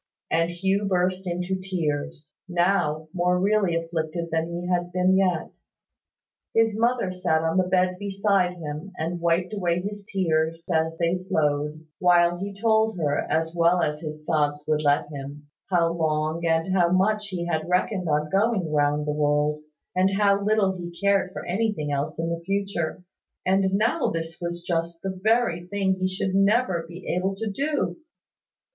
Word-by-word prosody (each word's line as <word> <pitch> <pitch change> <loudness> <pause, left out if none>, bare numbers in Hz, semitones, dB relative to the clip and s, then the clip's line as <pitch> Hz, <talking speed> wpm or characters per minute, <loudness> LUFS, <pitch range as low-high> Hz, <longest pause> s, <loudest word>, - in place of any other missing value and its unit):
And 165 +1 +2
Hugh 190 +4 0
burst 185 0 0
into 180 +2 -2
tears, 160 -4 -3 0.2
now 175 -4 +1
more 180 0 +2
really 200 -2 +2
afflicted 165 0 -3
than 160 0 0
he 170 +1 -4
had 175 -1 0
been 185 +1 +3
yet. 185 -4 +1 1.0
His 225 -1 +3
mother 235 -3 +1
sat 175 -3 0
on 160 +2 0
the 185 -1 +3
bed 185 0 +1
beside 195 -2 +1
him, 155 +3 -7
and 170 +2 -2
wiped 170 +3 +1
away 175 -4 0
his 205 +1 -6
tears 165 -3 0
as 160 0 +1
they 175 +2 0
flowed, 150 -2 0
while 175 -1 +4
he 200 +2 -4
told 220 +1 +2
her, 145 -3 0
as 160 +1 0
well 170 +1 +3
as 150 0 -1
his 155 -1 -7
sobs 150 -2 0
would 155 -1 +1
let 145 -1 +2
him, 145 +1 -8 0.2
how 170 -3 +2
long 155 0 -1
and 165 +3 +1
how 175 -2 +3
much 210 +3 +2
he 180 -3 -4
had 160 -1 -2
reckoned 180 0 0
on 150 0 0
going 195 -5 +1
round 145 0 +2
the 150 - 0
world, 150 0 +1 0.3
and 190 +1 +2
how 200 -1 +3
little 205 -2 +2
he 175 -1 -8
cared 200 -2 +2
for - - -7
anything 190 -6 -1
else 140 0 -2
in 165 0 -2
the 170 - -5
future; 195 -3 -2 0.4
and 190 +1 +2
now 225 +8 +1
this 165 0 -4
was 175 0 -4
just 170 -1 -2
the 190 - -1
very 215 -6 +2
thing 195 0 +1
he 185 - +1
should 185 0 -2
never 195 -3 +2
be 175 +2 -10
able 190 +2 0
to 220 +3 -4
do! 285 +7 -1
175 Hz, 170 wpm, -25 LUFS, 160-195 Hz, 1.0 s, while